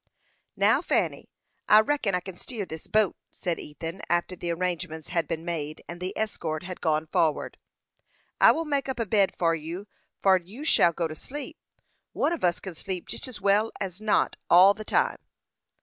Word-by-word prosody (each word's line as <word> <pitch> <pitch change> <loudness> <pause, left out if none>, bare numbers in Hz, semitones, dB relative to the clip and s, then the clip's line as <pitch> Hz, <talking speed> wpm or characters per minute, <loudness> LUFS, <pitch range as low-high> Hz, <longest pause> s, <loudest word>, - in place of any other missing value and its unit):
"Now, - - +4
Fanny, - - 0 0.4
I 210 - +9
reckon 220 -6 0
I 180 - 0
kin 190 0 -8
steer 215 +2 -5
this 160 -2 -8
boat," 215 -3 +2
said 175 -2 -3
Ethan, 165 +4 -7
after 175 +1 +1
the 175 0 -5
arrangements 165 -3 -3
had 165 -3 0
been 165 0 -4
made, 155 -3 -4
and 175 +1 -8
the 185 +1 -4
escort 165 -7 -2
had 185 0 -7
gone 155 -1 +1
forward. 155 -1 0 0.8
"I - - +8
will 330 - -1
make 280 -3 -1
up 260 - -3
a 230 - +1
bed 200 -2 +2
for 165 -1 +2
you 165 +5 -5 0.3
for'ad, 190 -2 +4
and 170 - -22
you 245 +9 -8
shall 175 - +5
go 170 0 -1
to 155 - -7
sleep. 280 - -7 0.5
One 305 +4 +1
on 335 - -5
us 175 -1 +2
kin 190 - -7
sleep 180 +2 -5
jest - - -5
as 255 - -8
well 205 +3 +3
as 190 0 -4
not, 215 -1 +2
all 185 +3 +8
the 215 - -8
time." - - +1
180 Hz, 195 wpm, -27 LUFS, 165-215 Hz, 0.8 s, I